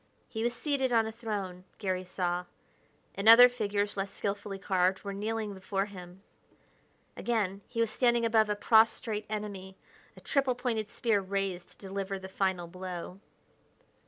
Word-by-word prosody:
He 220 - -5
was 240 +1 +1
seated 270 -1 0
on 225 -2 +4
a 220 - -4
throne, 200 -5 -5
Garry 185 -2 -2
saw, 180 -1 -2 0.7
and 200 +3 +3
other 245 +2 +11
figures, 205 -4 -1
less 195 0 -2
skilfully 200 0 -4
carved, 190 -1 +1
were 200 -1 -4
kneeling 215 +1 -3
before 195 +1 -2
him. 185 -1 -11 0.9
Again, 205 -5 -1
he 230 - -2
was 230 -2 +1
standing 240 -2 +2
above 220 -2 +3
a 210 - +1
prostrate 220 0 +3
enemy, 200 -3 -5 0.4
a - - -10
triple 270 -3 +1
pointed 225 -4 -2
spear 220 -3 +1
raised 190 -2 -3
to - - -19
deliver 195 0 -4
the 190 0 -8
final 190 -2 -1
blow. 180 +1 -7
200 Hz, 155 wpm, -30 LUFS, 190-225 Hz, 0.9 s, other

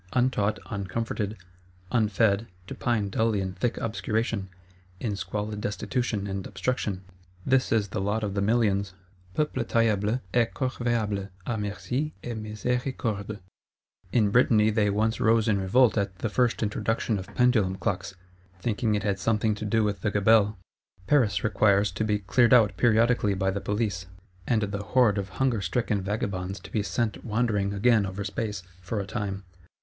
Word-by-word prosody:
Untaught, 120 -5 +1
uncomforted, 105 +1 -3 0.5
unfed; 110 -1 +2 0.2
to - - -7
pine 110 -4 0
dully 110 +1 +1
in 95 -1 -3
thick 115 +6 -1
obscuration, 110 -2 -2 0.5
in 105 -2 -2
squalid 105 +2 -4
destitution 110 0 -2
and 95 -1 -4
obstruction: 105 -7 -2 0.4
this 130 0 +2
is 105 -3 +2
the 100 - -3
lot 105 +3 -1
of 100 -2 -2
the 100 - -1
millions; 100 -3 +1 0.4
peuple 150 -5 0
taillable 110 0 +1
et 120 -2 +2
corvéable 115 -6 -1 0.2
à 115 -2 -2
merci 125 +8 -3
et 120 - -4
miséricorde. 110 -1 -3 0.7
In 105 -4 +3
Brittany 110 -2 +4
they 105 -1 +2
once 110 +3 0
rose 115 0 +3
in 105 -2 +2
revolt 120 +6 +4
at 100 -2 -2
the 115 - -2
first 120 +1 +1
introduction 110 0 -1
of 95 - -7
Pendulum 115 -7 +3
Clocks; 95 0 -3 0.4
thinking 110 +1 0
it 100 - -1
had 100 -2 0
something 110 +1 +1
to 105 +1 -6
do 110 +1 +2
with 105 -1 -1
the 105 - +1
Gabelle. 105 0 +3 0.5
Paris 105 -8 +2
requires 100 -2 +3
to 95 +4 -2
be 105 -1 +1
cleared 115 +5 +4
out 105 -5 +4
periodically 115 -1 +3
by 95 0 0
the 100 +1 -3
Police; 100 -3 -2 0.4
and 110 -3 +2
the 100 0 -3
horde 110 -2 +3
of 100 0 -4
hunger 130 -5 +1
stricken 105 +2 0
vagabonds 95 -1 -3
to - - -12
be 110 - 0
sent 105 +3 -2
wandering 105 -3 0
again 105 0 +3
over 95 +2 -5
space—for 100 -1 -4
a 100 - -3
time. 100 0 -4
105 Hz, 155 wpm, -27 LUFS, 100-115 Hz, 0.7 s, Brittany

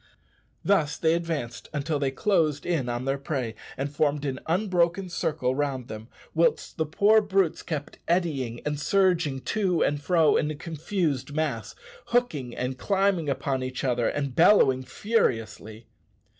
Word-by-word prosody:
Thus 155 -7 +2
they 160 0 +2
advanced 165 -8 -3
until 150 +1 -1
they 140 -1 +1
closed 155 -2 +1
in 155 -8 0
on 120 +1 -3
their 135 +1 -1
prey 135 -5 -3 0.2
and 140 +2 -3
formed 145 -1 +1
an 135 -1 -2
unbroken 180 0 +1
circle 130 -7 -1
round 135 -3 -2
them, 110 +1 -7 0.3
whilst 165 +1 +1
the 160 -2 0
poor 210 +7 +4
brutes 195 -4 +1
kept 150 -3 -5
eddying 145 -9 0
and 150 -1 -2
surging 175 -6 +2
to 185 +5 +1
and 145 0 0
fro 160 0 +3
in 150 - 0
a 155 - -3
confused 155 -3 -2
mass, 155 +1 -2 0.3
hooking 155 - 0
and 125 +1 -3
climbing 195 -5 +1
upon 135 -1 -1
each 130 0 -4
other, 120 -3 +1
and 140 -3 -2
bellowing 150 -8 +5
furiously. 115 - -1
150 Hz, 150 wpm, -26 LUFS, 130-175 Hz, 0.3 s, bellowing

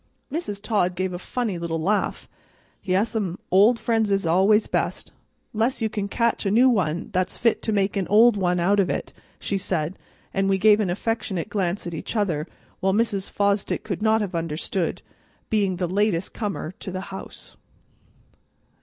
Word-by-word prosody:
Mrs. 250 - -3
Todd 200 -4 0
gave 185 0 -2
a 175 - -4
funny 215 -3 -3
little 165 -1 -2
laugh. 205 +6 -1 0.6
"Yes'm, 195 -1 0
old 205 +6 +6
friends 225 -2 +1
is 195 -2 +1
always 195 +6 +4
best, - - -2 0.4
'less 230 +4 0
you 220 -2 0
can 205 -1 -3
catch 235 +3 0
a 200 - 0
new 235 +6 +5
one 175 -8 0
that's 185 0 0
fit 230 -1 +2
to 220 - -2
make 200 -1 +1
an 195 -3 -1
old 225 +2 +6
one 180 -2 +1
out 200 +4 +3
of," 190 - +2 0.5
she 200 - -2
said, 180 -2 -2 0.3
and 195 0 +1
we 195 - +3
gave 210 +2 +5
an 205 -4 0
affectionate 200 -1 -2
glance 195 -2 -1
at 170 - -5
each 160 - -5
other 175 -7 0 0.3
which 190 0 +1
Mrs. 205 -3 0
Fosdick 200 0 0
could 205 -3 -4
not 220 0 +3
have 200 -3 -3
understood, 165 +2 -2 0.5
being 200 -4 +2
the 180 0 -1
latest 190 -1 0
comer 200 -7 -3
to - - -6
the 185 0 -4
house. 190 - -9
195 Hz, 170 wpm, -24 LUFS, 180-215 Hz, 0.6 s, old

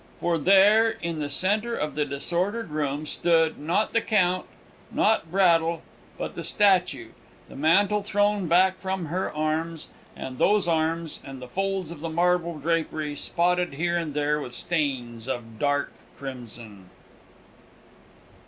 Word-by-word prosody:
For 170 -1 0
there, 200 +6 +6
in 170 -6 -4
the 145 -1 -3
centre 210 +10 +1
of 150 0 -3
the 150 -1 0
disordered 175 +8 -2
room, 150 0 -2
stood 165 0 +1
not 170 +8 0
the 230 - +3
Count, 185 -5 +1 0.4
not 210 -6 +2
Braddle 170 -3 +3 0.3
but - - -4
the - - -6
statue, 180 - +2 0.4
the - - -13
mantle 195 +8 +3
thrown 205 -1 +1
back 185 +3 +3
from 190 -2 -2
her 180 +5 -2
arms, 155 +1 -2 0.3
and 130 -1 -7
those 205 -3 +3
arms, 165 0 -1
and 135 -1 -9
the 125 - -9
folds 195 +2 -2
of 170 - -8
the 165 +2 -4
marble 170 0 +1
drapery, 155 -1 -1
spotted 175 +1 0
here 170 +3 0
and 165 -4 -2
there 150 0 +1
with 125 - -7
stains 130 -8 -2
of 115 -4 -5
dark 145 0 0 0.3
crimson! 115 -7 -9
165 Hz, 145 wpm, -25 LUFS, 145-185 Hz, 0.4 s, there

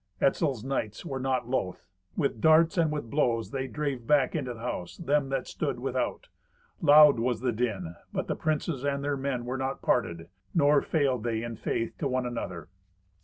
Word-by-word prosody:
Etzel's 135 -4 +1
knights 130 - -3
were 135 -5 -3
not 130 -2 -1
loth. 125 -8 -2 0.3
With 135 -6 0
darts 160 +3 +5
and 165 -4 +2
with 145 -7 -4
blows 120 -6 +1
they 135 -1 -2
drave 135 -4 -3
back 145 -3 +3
into 130 -6 -2
the - - -12
house 90 -7 -4
them 145 -4 +1
that 135 -2 -1
stood - - -3
without. - - -2 0.5
Loud 150 -4 +8
was 120 -1 0
the 125 -1 +1
din; 105 -7 -2 0.2
but - - -2
the - - -1
princes 155 -3 -1
and 140 0 -1
their 145 0 0
men 135 -3 -2
were 130 +2 -3
not 135 +1 -3
parted, 85 -8 0 0.3
nor 145 -2 +5
failed 140 -6 +1
they 115 -1 -1
in 115 -1 -5
faith 115 +2 -2
to 145 - 0
one 130 -1 -1
another. 100 -10 -5
130 Hz, 185 wpm, -28 LUFS, 115-145 Hz, 0.5 s, Loud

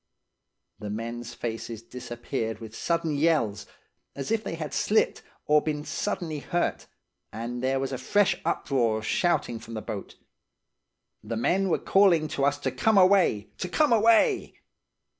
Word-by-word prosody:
"The 105 -2 -6
men's 115 +2 -5
faces 115 -1 -5
disappeared 120 -2 -5
with 110 -1 -10
sudden 170 -2 -1
yells, 140 -10 +1 0.5
as 140 +8 -5
if 225 -1 +1
they - - -4
had 155 -2 -5
slipped, 215 - +1 0.2
or 150 0 +4
been 150 -1 -3
suddenly 165 -7 -3
hurt; 175 +4 -2 0.4
and 120 +3 -5
there 135 +1 +1
was 135 0 -2
a 130 - -3
fresh 195 +7 +2
uproar 120 -5 +1
of 110 - -6
shouting 120 -6 0
from 115 +1 -9
the - - -2
boat. 105 -3 -6 1.1
The 110 +2 -4
men 190 +11 +1
were - - +2
calling 180 -6 +4
to 140 -1 0
us 145 0 +2
to - - -1
come 220 -3 +2
away–to 185 - +3
come 300 - +3
away. 225 0 +3
140 Hz, 150 wpm, -27 LUFS, 115-175 Hz, 1.1 s, or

